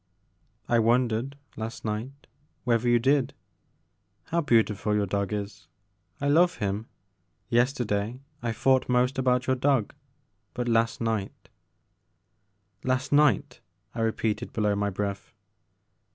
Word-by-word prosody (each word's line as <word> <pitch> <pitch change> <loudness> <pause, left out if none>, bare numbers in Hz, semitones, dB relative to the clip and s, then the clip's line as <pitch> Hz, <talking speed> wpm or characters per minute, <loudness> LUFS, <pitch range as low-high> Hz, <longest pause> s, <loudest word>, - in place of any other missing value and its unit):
I 120 - +3
wondered, 120 +3 +1 0.2
last 110 +1 -6
night, 115 +7 -4 0.4
whether 120 -1 +2
you 120 - +5
did. 135 +2 +2 0.9
How 170 - -1
beautiful 110 -6 +2
your 105 -1 +2
dog 100 0 -2
is; 100 -1 -5 0.5
I 140 - -1
love 175 +5 +4
him. 105 +2 -3 0.6
Yester 125 +2 +2
day 105 +4 -2 0.2
I 120 -1 -1
thought 130 +4 +2
most 125 +2 +2
about 125 -1 +2
your 130 - +2
dog 130 -4 +1 0.6
but 125 -1 -2
last 115 0 +1
night 110 -4 -3 0.7
' 100 0 -44
Last 130 +2 -3
night," 145 0 +3 0.3
I 115 - -3
repeated 110 0 -1
below 105 -2 +1
my 100 0 0
breath. 100 0 -4
115 Hz, 125 wpm, -27 LUFS, 105-130 Hz, 0.9 s, you